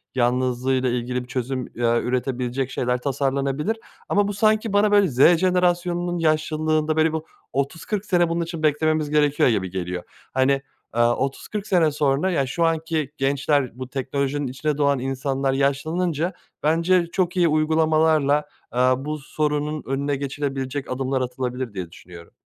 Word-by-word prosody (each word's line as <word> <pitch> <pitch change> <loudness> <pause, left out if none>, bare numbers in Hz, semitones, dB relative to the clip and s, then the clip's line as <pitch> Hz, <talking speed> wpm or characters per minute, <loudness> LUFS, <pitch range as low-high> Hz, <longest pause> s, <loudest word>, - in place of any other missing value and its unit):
yalnızlığıyla 130 +1 +1
ilgili 125 +1 -2
bir - - -14
çözüm, 130 -1 -3
eee, 120 0 +2
üretebilecek 125 +1 -1
şeyler 125 0 0
tasarlanabilir. 140 - -1 0.3
Ama 205 0 +2
bu 205 - -2
sanki 215 +1 +2
bana, 205 +1 +4
böyle, 205 -2 +5
Z 145 +5 +5
jenerasyonunun 175 -1 +1
yaşlılığında, 155 0 +1
böyle, 160 0 +2
bir 160 - -1 0.3
30-40 165 +9 -2
sene 175 -4 +2
bunun 170 +1 0
için 165 -1 -6
beklememiz 155 0 +2
gerekiyor 145 -2 +3
gibi 100 -5 0
geliyor. 90 -1 -4 0.3
Hani, 130 +1 +3 0.4
eee, 120 - +3
30-40 135 - -1
sene 170 -6 +3
sonra, 145 +5 +1
yani, 140 -6 +1
şu 170 +6 0
anki 160 -3 -1
gençler, 140 -1 +1
bu 130 - -5
teknolojinin 140 +1 -2
içine 145 +3 -2
doğan 140 -2 +2
insanlar 135 +1 -1
yaşlanınca 155 +5 0 0.3
bence 170 +3 +3
çok 185 0 0
iyi 175 -1 +4
uygulamalarla, 155 -1 +3 0.3
eee, - - +1 0.2
bu 150 +3 -4
sorunun 150 +1 -2
önüne 140 +2 -1
geçilebilecek 135 -1 -3
adımlar 130 +1 -1
atılabilir 125 -1 -3
diye 90 -4 -5
düşünüyorum. 85 -1 -13
145 Hz, 145 wpm, -23 LUFS, 130-160 Hz, 0.4 s, böyle